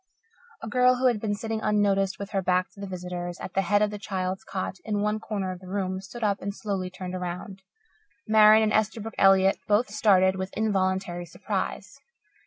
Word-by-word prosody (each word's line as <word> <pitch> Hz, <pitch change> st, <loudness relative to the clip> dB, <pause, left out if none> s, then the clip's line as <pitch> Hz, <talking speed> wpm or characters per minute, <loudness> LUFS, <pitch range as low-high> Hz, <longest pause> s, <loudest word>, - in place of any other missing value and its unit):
A -, -, -4 dB
girl, 250 Hz, +2 st, +4 dB
who 255 Hz, +1 st, -1 dB
had 240 Hz, -4 st, +3 dB
been 205 Hz, -2 st, -1 dB
sitting 220 Hz, +1 st, -4 dB
unnoticed 200 Hz, -2 st, +1 dB
with 200 Hz, 0 st, -7 dB
her 195 Hz, -2 st, 0 dB
back 180 Hz, 0 st, +1 dB
to -, -, -18 dB
the 200 Hz, -, -5 dB
visitors, 180 Hz, -1 st, -5 dB
at 185 Hz, -, -7 dB
the 195 Hz, -, +2 dB
head 205 Hz, +3 st, +2 dB
of 210 Hz, -, 0 dB
the 210 Hz, -, -6 dB
child's 190 Hz, -2 st, -3 dB
cot 190 Hz, 0 st, -4 dB
in 210 Hz, -2 st, -2 dB
one 210 Hz, +1 st, 0 dB
corner 200 Hz, -4 st, -3 dB
of 185 Hz, -, -7 dB
the 185 Hz, -, -13 dB
room, 190 Hz, -1 st, -2 dB
stood 210 Hz, +5 st, -9 dB
up 200 Hz, -2 st, +1 dB
and 200 Hz, +1 st, -4 dB
slowly 195 Hz, -4 st, -3 dB
turned 180 Hz, 0 st, -7 dB
around. 180 Hz, +2 st, -5 dB, 0.7 s
Marian 215 Hz, 0 st, +7 dB
and 215 Hz, -, +1 dB
Esterbrook 220 Hz, +1 st, 0 dB
Elliott 195 Hz, 0 st, +5 dB
both 210 Hz, +1 st, +2 dB
started 190 Hz, -3 st, +3 dB
with 190 Hz, 0 st, -5 dB
involuntary 190 Hz, -4 st, -1 dB
surprise. 195 Hz, +5 st, -4 dB
195 Hz, 195 wpm, -26 LUFS, 185-215 Hz, 0.7 s, Marian